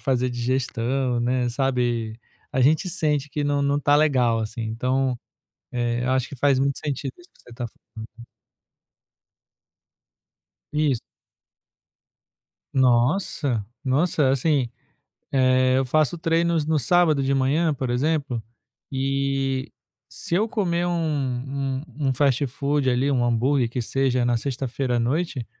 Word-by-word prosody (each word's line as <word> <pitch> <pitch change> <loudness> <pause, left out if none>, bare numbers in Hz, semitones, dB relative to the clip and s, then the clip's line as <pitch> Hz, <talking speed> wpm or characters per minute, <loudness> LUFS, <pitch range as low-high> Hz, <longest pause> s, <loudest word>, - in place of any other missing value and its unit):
fazer 130 -2 0
digestão, 125 0 -1
né, 125 0 0
sabe, 120 -3 -1 0.3
a 130 - +1
gente 155 +8 +3
sente 150 -4 0
que 145 +1 -3
não 145 0 +1
não 140 0 +1
está 145 0 +3
legal, 130 -7 +3
assim, 110 +1 -4
então, 125 +3 -1 0.6
eh, 120 0 -1
eu 130 - +1
acho 130 -1 0
que 140 - -8
faz 140 0 +3
muito 140 0 +1
sentido 140 -2 -3
isso 175 - -18
que - - -24
você - - -18
está 120 0 -5
falando. - - -27 2.8
Isso. 150 -5 +1 1.7
Nossa! 125 - +2 0.2
Nossa, 145 +2 +2
assim, 135 -1 +1 0.6
é, 130 -1 +3
eu 135 - +1
faço 155 +5 +1
treinos 165 -1 +1
no 155 0 +1
sábado 155 +1 +3
de 135 +1 +1
manhã, 145 +4 +2
por 130 -2 -3
exemplo, 140 -1 0 0.5
e 135 0 -1 0.4
se - - -6
eu 215 +4 +2
comer 175 -6 0
um 135 -5 -2
um 140 0 -4
um 130 - +2
fast-food 140 +1 +1
ali, 130 +3 +1
um 125 -3 +2
hambúrguer 120 +1 +2
que 125 - -3
seja, 130 +1 0
na 120 -1 +2
sexta-feira 130 0 -2
à - - +1
noite, 135 0 -1
135 Hz, 135 wpm, -24 LUFS, 125-145 Hz, 2.8 s, gente